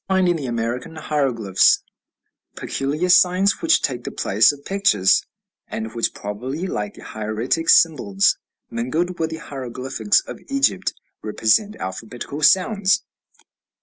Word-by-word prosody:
We 190 - +2
find 185 -1 +3
in 175 - +2
the 140 -4 -5
American 120 +6 -3
hieroglyphs 130 -11 +2 0.7
peculiar 145 +6 -2
signs 185 +2 +4
which 330 -1 +3
take 125 -3 -2
the - - -4
place 105 +7 +3
of 145 -1 -13
pictures, 150 - +3 0.4
and 110 0 -5
which 115 - -1
probably, 125 - -5
like 105 - -4
the - - -13
hieratic 110 +9 -2
symbols 105 -12 +4 0.4
mingled 160 +10 -2
with 160 -1 0
the 160 - -5
hieroglyphics 130 - -1
of - - -9
Egypt, 275 -9 0 0.3
represent 110 - +1
alphabetical 115 +9 -6
sounds. 190 +3 +3
140 Hz, 130 wpm, -21 LUFS, 115-180 Hz, 0.7 s, signs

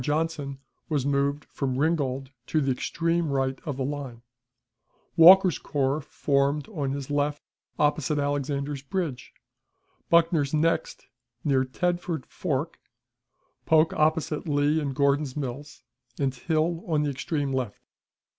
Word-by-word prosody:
Johnson 150 -1 -1 0.3
was 145 -4 0
moved 140 +1 0
from 130 -2 -3
Ringgold 135 -3 0 0.2
to 155 - +1
the 135 -2 +1
extreme 165 +5 -1
right 135 -1 0
of 145 -4 -3
the 135 - -1
line; 135 -4 -5 0.9
Walker's 180 +1 +8
corps 140 +1 -1
formed 140 +1 0
on 150 -10 -2
his 140 0 -4
left 145 0 0 0.3
opposite 150 0 +1
Alexander's 145 0 -2
Bridge, 145 -4 -4 0.8
Buckner's 165 -4 +3
next, 165 +2 0 0.4
near 135 -3 +2
Tedford 175 +2 -2
Ford, - - -2 1.0
Polk 160 +1 +4
opposite 155 0 0
Lee 145 +1 +2
and 140 -3 -3
Gordon's 140 0 +1
Mills, 140 +1 -6 0.3
and 135 -2 0
Hill 160 +5 -1
on 155 -3 +1
the 145 - 0
extreme 140 +1 -2
left. 125 -6 -3
145 Hz, 125 wpm, -26 LUFS, 135-155 Hz, 1.0 s, Walker's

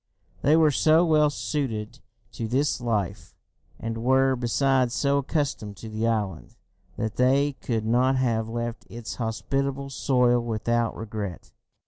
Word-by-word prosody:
They 150 +3 +4
were 155 -2 +5
so 160 +4 +4
well 155 -2 +4
suited 115 -1 -3 0.3
to 115 - -4
this 135 +3 0
life, 105 -7 -2 0.4
and 115 +1 -4
were, 130 +1 +3
besides, 125 +1 +1
so 140 0 +2
accustomed 135 - -2
to 110 - -8
the 110 +1 -1
island, 100 - -2 0.4
that 110 -1 -3
they 135 +3 +3
could 115 -3 -2
not 125 +4 +3
have 115 -4 0
left 120 0 -4
its 115 -1 -7
hospitable 135 +4 -2
soil 125 -3 +2
without 120 0 -1
regret! 105 -5 -6
120 Hz, 135 wpm, -25 LUFS, 110-135 Hz, 0.4 s, were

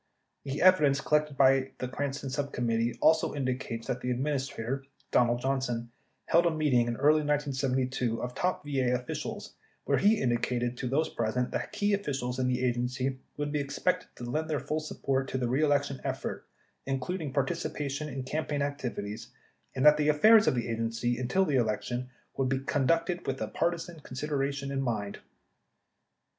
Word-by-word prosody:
The 140 +3 -2
evidence 150 -7 +6
collected 150 0 +1
by 135 -1 +4
the 125 - -3
Cranston 140 +1 -3
subcom 140 -2 -2
mittee 115 +1 0
also 160 -1 +4
indicates 130 -4 -3
that 125 - -3
the 125 - -2
Administrator, 135 -1 -2 0.3
Donald 120 0 +3
Johnson, 125 -3 -1 0.3
held 170 +1 +4
a - - +5
meeting 150 -7 +2
in 120 - -1
early 150 +4 +4
1972 135 -4 0
of 125 0 -4
top 180 +4 -1
VA 130 -3 +1
officials 125 0 -5 0.3
where - - +2
he 210 +2 +4
indicated 120 0 0
to 125 - -3
those 150 +5 +1
present 120 0 -1
that - - -3
key 205 0 +1
officials 135 -10 -2
in 130 - +1
the 125 0 +1
Agency 125 +2 -1 0.2
would 145 0 -2
be 150 - 0
expected 140 -1 -1
to - - -9
lend 155 +7 -2
their 150 -2 0
full 155 - -2
support 135 -3 -2
to - - -2
the 125 -2 0
reelection 140 +1 +1
effort, - - -4 0.4
including 145 +3 -2
participation 145 +1 -2
in 135 -1 -4
cam 155 +4 -2
paign 145 -1 -1
activities, 120 -7 -4 0.5
and 130 +2 +1
that 150 0 +8
the 150 0 +2
affairs 215 +9 +6
of - - +4
the 120 - -1
Agency, 115 +1 -1
until 155 +10 +2
the 145 -6 +1
election, 120 +2 -1 0.3
would 135 -1 +1
be 135 - +1
conducted 165 +6 0
with 135 - -1 0.2
partisan 170 -1 -1
considerations 140 0 -3
in 135 -1 -1
mind. 110 -6 -2
135 Hz, 165 wpm, -29 LUFS, 125-150 Hz, 0.5 s, that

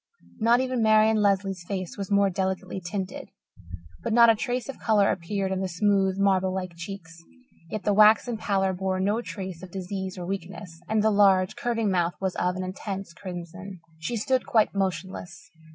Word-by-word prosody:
Not 235 +3 +4
even 255 -2 -1
Marian 220 0 +5
Lesley's 195 -3 +1
face 185 -1 -4
was 200 -2 -5
more 200 -1 +3
delicately 190 +1 -3
tinted, 190 +1 -5 0.7
but - - -3
not 235 0 +7
a - - +2
trace 245 +3 -3
of 275 - -7
colour 210 -3 +3
appeared 190 +2 -2
in 190 0 -1
the 190 - -1
smooth, 195 +1 +1
marble 190 -1 +2
like 185 -2 -4
cheeks; 170 -1 -9 0.5
yet 215 +2 -4
the 205 - +2
waxen 215 +3 +5
pallor 195 -3 0
bore 185 0 -2
no 205 +5 +1
trace 190 -7 -7
of 185 - -9
disease 190 +1 -5
or 175 - -5
weakness, 180 -2 -6
and 220 -1 +2
the 220 - +4
large, 195 -2 +4
curving 230 -4 -1
mouth 175 -2 +1
was 190 -1 -1
of 180 0 0
an 185 - -3
intense 190 -1 -6
crimson. 180 +1 -8 0.2
She 160 +9 -3
stood 255 +4 0
quite 220 -2 +3
motionless. 185 -2 -4
195 Hz, 180 wpm, -26 LUFS, 185-210 Hz, 0.7 s, not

